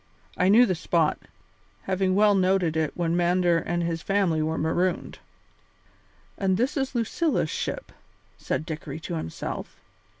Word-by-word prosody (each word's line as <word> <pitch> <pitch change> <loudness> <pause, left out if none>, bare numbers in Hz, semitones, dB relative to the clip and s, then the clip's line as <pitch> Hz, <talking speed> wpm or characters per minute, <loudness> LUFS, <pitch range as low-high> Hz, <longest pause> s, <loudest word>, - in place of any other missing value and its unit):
I 185 - +2
knew 230 +5 +7
the 185 - 0
spot, 165 -2 +1 0.6
having 190 0 0
well 210 0 +5
noted 185 -4 +2
it 160 -1 -1
when 170 -1 0
Mander 175 -1 +3
and 175 +1 -2
his 165 -1 -2
family 190 -5 +1
were 160 +1 -1
marooned." 175 +4 -1 1.2
"And 190 -2 +1
this 255 +6 0
is 270 -2 -2
Lucilla's 280 +7 0
ship," - - -4 0.4
said 155 - -3
Dickory 155 -2 -6
to 170 - -5
himself. 120 - -5
180 Hz, 140 wpm, -26 LUFS, 165-195 Hz, 1.2 s, knew